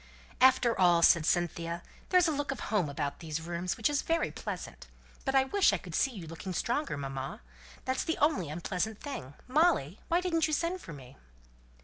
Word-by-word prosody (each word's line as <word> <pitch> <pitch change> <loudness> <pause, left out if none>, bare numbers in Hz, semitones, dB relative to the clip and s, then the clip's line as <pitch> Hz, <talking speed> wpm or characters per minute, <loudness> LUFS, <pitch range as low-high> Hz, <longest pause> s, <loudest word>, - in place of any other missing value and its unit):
"After 255 -2 +5
all," 175 -2 +5
said 165 -2 +6
Cynthia, 170 -1 0 0.3
"there's 365 -1 +5
a - - +2
look 290 -1 -2
of 270 - -5
home 200 -8 0
about 140 0 -3
these 160 -2 -4
rooms 170 +2 -3
which 225 - +2
is 290 -1 +1
very 330 0 0
pleasant. - - -7 0.4
But 270 -1 0
I 265 - +6
wish 390 +9 +3
I - - +2
could - - -10
see 270 - +2
you 200 -10 -8
looking 165 +4 -6
stronger, 240 - -1
mamma! 135 - -5 0.4
that's 260 0 0
the 325 - -1
only 285 - +2
unpleasant 185 +6 -3
thing. 145 - -7
Molly, 260 - +2
why 340 - +3
didn't 335 -3 +1
you 310 - -3
send 340 +4 -1
for 165 - -9
me?" 130 -3 -11
205 Hz, 195 wpm, -31 LUFS, -, 0.4 s, said